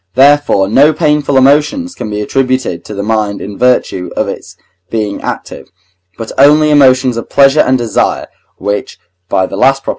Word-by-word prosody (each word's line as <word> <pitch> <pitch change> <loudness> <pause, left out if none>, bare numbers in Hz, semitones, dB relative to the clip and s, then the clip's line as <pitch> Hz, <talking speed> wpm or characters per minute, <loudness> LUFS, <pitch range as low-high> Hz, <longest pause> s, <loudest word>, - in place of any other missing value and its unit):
therefore, 140 -7 +3
no 140 +9 +4
painful 150 -3 0
emotions 150 - +2
can - - -6
be 105 0 -4
attributed 130 -6 -2
to - - -8
the 100 - -4
mind 105 -2 -2
in 100 0 -7
virtue 125 -7 0
of - - 0
its - - -8 0.3
being 105 -3 -3
active, - - -7 0.5
but 115 -1 -7
only 150 +2 +5
emotions 130 -4 +3
of 115 - -6
pleasure 140 +1 +3
and 130 -3 +3
desire, 115 -4 -1 0.3
which 100 0 -4 0.3
(by 95 - +1
the 95 - -7
last 135 +6 +1
Prop.) - - -6
130 Hz, 170 wpm, -11 LUFS, 105-145 Hz, 0.5 s, only